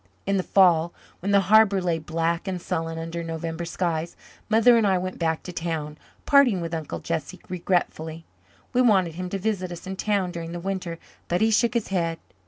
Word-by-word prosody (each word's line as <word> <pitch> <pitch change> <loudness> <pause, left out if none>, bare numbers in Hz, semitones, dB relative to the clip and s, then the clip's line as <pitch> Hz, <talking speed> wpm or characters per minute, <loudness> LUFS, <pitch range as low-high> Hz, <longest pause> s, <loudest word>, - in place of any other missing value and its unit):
In 195 0 +1
the - - +2
fall, 175 -3 +4 0.3
when 200 +3 -2
the 200 0 +5
harbour 200 0 +5
lay 175 -3 0
black 165 +3 -2
and 185 -2 -2
sullen 165 -1 -3
under 165 +1 -4
November 165 +1 -4
skies, 170 -1 -2 0.3
Mother 225 +2 +6
and 225 -3 +3
I 190 -1 +3
went 185 +1 -4
back 160 -1 0
to 180 - -7
town, 160 -3 -3 0.3
parting 275 -9 +5
with 165 0 -4
Uncle 155 - -4
Jesse - - -4
regretfully. 165 -3 -2 0.5
We 250 - +4
wanted 190 -9 +3
him 180 +2 -5
to 195 - -2
visit 190 -2 -2
us 175 +1 -8
in 190 0 -5
town 200 -3 0
during 170 -1 -6
the 175 - -4
winter 185 -2 -4 0.3
but 175 - 0
he 220 0 +4
shook 235 +2 +2
his 235 - 0
head. 170 -3 0
180 Hz, 195 wpm, -25 LUFS, 165-195 Hz, 0.5 s, Mother